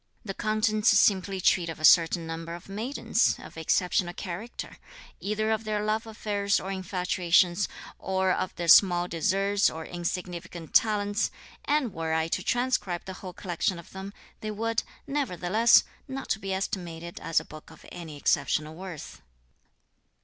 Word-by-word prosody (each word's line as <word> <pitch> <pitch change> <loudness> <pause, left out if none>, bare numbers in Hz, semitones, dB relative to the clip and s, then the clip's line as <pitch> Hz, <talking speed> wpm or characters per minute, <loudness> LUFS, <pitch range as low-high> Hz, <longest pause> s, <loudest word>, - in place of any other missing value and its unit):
The 195 - -4
contents 215 +1 +1
simply 195 -1 +3
treat 175 -2 +3
of 165 - -6
a 155 - +2
certain 165 0 +6
number 165 +1 -5
of 175 - -12
maidens, 220 +8 0
of - - -12
exceptional 175 +2 +1
character; 195 +6 -6 0.4
either 215 +2 -1
of 220 0 0
their 210 -1 -1
love 220 +1 -1
affairs 205 -2 0
or 190 - -5
infatuations, 180 -1 +1 0.3
or 190 0 0
of 185 - -1
their 170 - -4
small 175 0 +6
deserts 195 +4 +2
or 160 0 -7
insignificant 175 -1 -5
talents; 205 -1 +2 0.4
and 285 -8 +1
were 160 0 -2
I 160 0 0
to - - -1
transcribe 240 -8 0
the 190 - -6
whole 185 -2 -7
collection 175 0 -2
of 170 - -12
them, 190 +1 -7 0.3
they 215 - -5
would, 225 +2 -1 0.2
nevertheless, 230 - +3 0.2
not 270 -4 -2
be 195 - -4
estimated 170 -3 -4
as 165 - +1
a - - -10
book 155 0 -12
of - - -16
any 165 -4 -8
exceptional 155 +2 +1
worth." 175 -2 -9
190 Hz, 150 wpm, -27 LUFS, 170-210 Hz, 0.4 s, certain